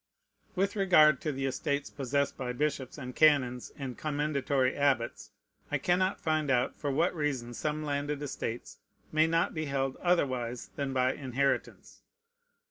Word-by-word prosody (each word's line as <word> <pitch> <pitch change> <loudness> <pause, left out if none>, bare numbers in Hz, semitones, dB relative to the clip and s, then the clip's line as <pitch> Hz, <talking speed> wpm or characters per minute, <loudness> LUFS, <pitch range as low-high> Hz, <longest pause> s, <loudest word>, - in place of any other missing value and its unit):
With 195 +3 0
regard 155 -8 +5
to 155 - -1
the 135 -1 -3
estates 140 +2 -2
possessed 140 +1 -1
by 125 -2 -4
bishops 140 -1 -2
and 125 -3 -7
canons 135 -5 +3
and 130 -3 -5
commendatory 145 -3 0
abbots, 135 -5 0 0.4
I - - +2
cannot 185 +2 +1
find 155 -2 0
out 125 -1 +2
for 145 - -3
what 155 +6 +2
reason 140 -7 -2
some 150 +4 -2
landed 145 0 -2
estates 120 -4 -5 0.3
may 155 +1 +4
not 165 +1 +1
be 155 -1 -2
held 135 -1 -1
otherwise 130 -9 0
than 140 -2 -2
by 130 0 +2
inheritance. 135 0 -2
140 Hz, 145 wpm, -30 LUFS, 130-155 Hz, 0.4 s, regard